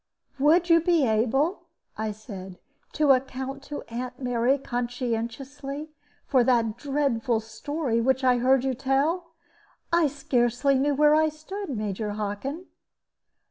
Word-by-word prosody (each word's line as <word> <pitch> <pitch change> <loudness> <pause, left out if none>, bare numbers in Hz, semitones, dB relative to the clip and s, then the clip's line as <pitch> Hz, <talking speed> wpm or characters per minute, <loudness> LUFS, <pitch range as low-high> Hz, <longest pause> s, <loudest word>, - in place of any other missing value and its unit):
"Would 325 +5 +4
you 335 -1 +5
be 335 -4 +3
able," 270 - +1 0.3
I 215 0 -2
said, 195 -4 -9 0.4
"to 300 -2 +4
account 265 +1 -1
to 295 - -6
Aunt 250 +2 -5
Mary 245 +1 +1
conscientiously 250 +4 -4 0.3
for 260 -3 +3
that 230 -3 +2
dreadful 265 -3 0
story 235 +2 -2
which 265 +2 +1
I 250 -1 +4
heard 260 +1 +3
you 265 -1 0
tell? 285 +7 0 0.6
I 340 -2 +5
scarcely 265 -1 +1
knew 285 +1 +1
where 300 +1 +5
I 310 0 +4
stood, 380 +6 -7
Major 210 -3 -3
Hockin." 215 - -4
265 Hz, 130 wpm, -26 LUFS, 235-295 Hz, 0.6 s, you